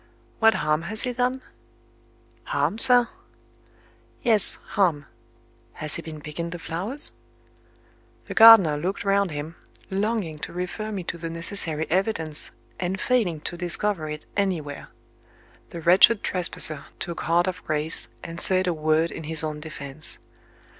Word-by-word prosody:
"What 225 0 +5
harm 155 +1 0
has 220 +1 +2
he 250 - -2
done?" 255 +1 -1 1.0
"Harm, 365 - -1
sir?" 245 -1 +7 1.2
"Yes 220 -5 +2
harm. 170 -9 +1 0.7
Has 155 -1 -5
he - - -4
been 155 -2 -9
picking 160 +3 -6
the 175 - -6
flowers?" 185 - +3 1.1
The - - -7
gardener 220 -10 +8
looked 185 +7 -4
round 200 -1 +2
him, 150 +2 -7 0.3
longing 195 -5 -2
to - - -6
refer 180 +5 -5
me 195 -3 -4
to 170 0 -6
the 165 0 -5
necessary 165 -2 -1
evidence, 170 -5 -1 0.3
and 185 +1 -3
failing 195 -12 0
to 175 - -4
discover 175 -1 -1
it 150 0 -7
anywhere. 170 -8 -3 0.8
The 170 - -8
wretched 185 +6 +5
trespasser 160 -5 0
took 170 - -5
heart 170 +2 +2
of 185 -1 -5
grace, 155 +1 0 0.2
and 165 +1 -7
said 185 0 +2
a 180 - 0
word 155 +1 0
in 160 - -8
his 160 0 +2
own 155 -1 -4
defence. 150 -1 -7
175 Hz, 140 wpm, -24 LUFS, 155-200 Hz, 1.2 s, gardener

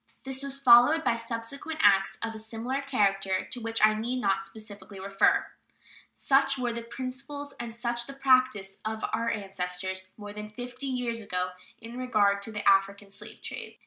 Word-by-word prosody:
This 265 0 -1
was 275 0 -1
followed 275 +4 +7
by 235 - +2
subsequent 235 +7 -5
acts 195 -1 +4
of 225 0 -2
a 220 - -7
similar 230 +5 -3
character, 195 -8 +1
to 245 - -5
which 225 -1 +3
I 215 - +4
need 235 +4 -2
not 195 -4 +1
specially 205 0 -10
refer. 195 +1 +2 0.7
Such 275 0 +2
were 245 -2 -1
the 235 - -4
principles 270 +4 -6
and 235 -1 -6
such 235 0 -2
the 275 - -7
practice 255 -8 +2
of 220 0 -3
our 230 +1 0
ancestors 190 -2 -4
more 205 -1 -8
than 210 0 -7
fifty 245 +4 -7
years 245 -3 -2
ago 180 -3 -2 0.3
in 235 +2 -8
regard 205 -5 +2
to 225 - -6
the 210 -1 -3
African 195 +1 +3
slave 210 +2 -11
trade. - - -7
230 Hz, 175 wpm, -28 LUFS, 200-255 Hz, 0.7 s, followed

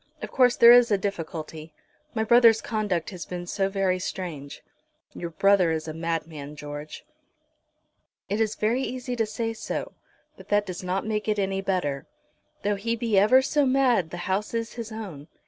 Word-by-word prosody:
Of - - -5
course 250 -2 +4
there 235 0 +8
is 245 -1 +7
a 205 - +3
difficulty. 165 -5 -5 0.4
My 220 - +1
brother's 230 -1 +6
conduct 210 -7 -2
has 180 -3 -7
been 175 -1 -6
so 195 +2 -1
very 195 -2 0
strange." 160 -7 -6 0.5
"Your 170 - -5
brother 190 +1 +3
is 160 0 -2
a 155 - -4
madman, 160 -3 -4
George." 145 +1 -8 1.2
"It 205 +3 -1
is 220 -1 0
very 230 +5 0
easy 250 -1 -4
to 225 -2 0
say 225 +1 -3
so, 225 - -5 0.5
but - - -14
that 205 0 +2
does 185 -3 -6
not 185 +2 -2
make 215 -1 -2
it 210 -1 +1
any 195 -1 -1
better. 160 -8 -2 0.6
Though 205 0 0
he 230 +4 -1
be 225 -3 +2
ever 255 +6 +5
so 295 +2 +2
mad 255 -10 +2
the 175 - -7
house 200 +4 -1
is 230 0 -3
his 230 -2 -7
own. 190 -10 -8
200 Hz, 180 wpm, -26 LUFS, 170-225 Hz, 1.2 s, there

